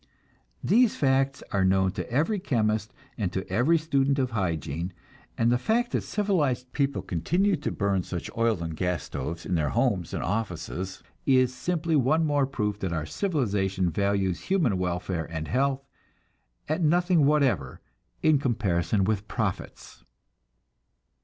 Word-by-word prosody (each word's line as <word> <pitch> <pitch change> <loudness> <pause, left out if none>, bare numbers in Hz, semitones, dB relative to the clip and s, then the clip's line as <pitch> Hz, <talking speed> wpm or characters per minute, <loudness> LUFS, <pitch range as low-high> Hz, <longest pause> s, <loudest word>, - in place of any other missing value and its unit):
These 240 0 +4
facts 135 0 +1
are 100 -1 +2
known 95 0 +3
to 105 - -5
every 165 - +1
chemist 110 - 0 0.3
and 95 -5 -1
to 95 0 -3
every 125 - +3
student 140 -3 +1
of 130 -2 0
hygiene, 85 -4 -2 0.4
and 115 +1 +3
the 120 - +2
fact 240 - +1
that - - 0
civilized 155 - -1
people 140 -1 0
continue 180 - +1
to 150 - -3
burn 100 -2 0
such 85 -1 -5
oil 115 -6 +1
and 80 -1 -4
gas 90 -3 -1
stoves 85 +2 -5
in 90 - -2
their 75 -4 +1
homes 90 - 0
and - - -3
offices 95 -2 -3 0.2
is 130 -2 +4
simply 160 +4 -1
one 150 +4 +3
more 145 -3 +2
proof 105 -6 -2
that 95 -3 -2
our 80 -2 -2
civilization 100 - 0
values 100 -1 0
human 160 - +1
welfare 90 -2 -2
and 80 -1 -4
health 135 +1 0 0.8
at 155 +4 -1
nothing 170 -1 +3
whatever 130 - +1 0.4
in 155 -3 +5
comparison 105 -6 +1
with 105 +1 -1
profits. 105 -4 -4
115 Hz, 145 wpm, -27 LUFS, 95-145 Hz, 0.8 s, in